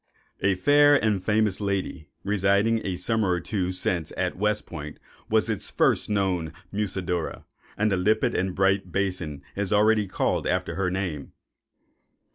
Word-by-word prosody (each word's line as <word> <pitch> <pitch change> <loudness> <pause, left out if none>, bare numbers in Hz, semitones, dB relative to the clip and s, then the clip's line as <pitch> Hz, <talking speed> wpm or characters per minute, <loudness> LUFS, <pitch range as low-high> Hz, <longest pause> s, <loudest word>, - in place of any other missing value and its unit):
A 100 -1 +2
fair 145 +9 +5
and 105 -7 +1
famous 105 -2 +1
lady, 95 -6 -2 0.2
residing 100 +3 +2
a 95 - -2
summer 110 +1 0
or 90 -1 +1
two 90 -1 -2
since 90 -3 -2
at - - -1
West 105 +2 0
Point, 75 -3 -8 0.3
was - - +2
its - - -3
first - - +1
known 95 -6 0 0.2
Musidora, 95 -5 -3 0.3
and 110 +1 +1
the 95 - +2
limpid 110 +6 +2
and 95 0 -1
bright 95 -1 +1
basin 90 -6 -2
is 100 -1 -2
already 105 0 +3
called 95 - -1
after - - -1
her 90 +1 0
name. 90 -7 -4
95 Hz, 150 wpm, -25 LUFS, 90-105 Hz, 0.3 s, fair